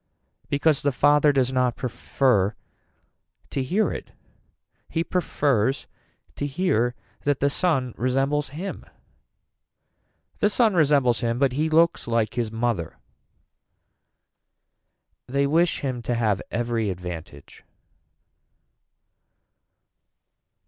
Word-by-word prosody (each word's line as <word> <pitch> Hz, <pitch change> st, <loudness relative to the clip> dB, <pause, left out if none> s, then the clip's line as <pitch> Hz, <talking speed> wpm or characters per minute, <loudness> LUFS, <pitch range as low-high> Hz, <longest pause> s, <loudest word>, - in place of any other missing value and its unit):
Because 145 Hz, +1 st, +2 dB
the 145 Hz, -, +1 dB
father 145 Hz, +2 st, +4 dB
does 130 Hz, -2 st, +1 dB
not 125 Hz, -2 st, +1 dB
prefer 120 Hz, -4 st, 0 dB, 1.0 s
to 135 Hz, -, -1 dB
hear 185 Hz, +12 st, +1 dB
it. -, -, -6 dB, 0.8 s
He 165 Hz, -, -1 dB
prefers 140 Hz, -, 0 dB, 0.5 s
to 145 Hz, -, -2 dB
hear 130 Hz, -7 st, 0 dB, 0.3 s
that 145 Hz, -2 st, +1 dB
the 140 Hz, 0 st, +2 dB
son 135 Hz, -8 st, 0 dB
resembles 135 Hz, +4 st, 0 dB
him. 170 Hz, +8 st, -6 dB, 1.6 s
The 210 Hz, -, +3 dB
son 220 Hz, 0 st, +3 dB
resembles 140 Hz, -7 st, +3 dB
him 115 Hz, -1 st, -1 dB
but 135 Hz, 0 st, +2 dB
he 155 Hz, +5 st, 0 dB
looks 165 Hz, -2 st, +3 dB
like 115 Hz, -2 st, 0 dB
his 120 Hz, -3 st, -2 dB
mother. 115 Hz, -7 st, -2 dB, 2.3 s
They 140 Hz, +2 st, +1 dB
wish 165 Hz, +4 st, +2 dB
him 130 Hz, -3 st, -3 dB
to 120 Hz, +1 st, -2 dB
have 105 Hz, -4 st, +1 dB
every 115 Hz, -2 st, -1 dB
advantage. 85 Hz, -5 st, -8 dB
130 Hz, 100 wpm, -24 LUFS, 115-150 Hz, 2.3 s, father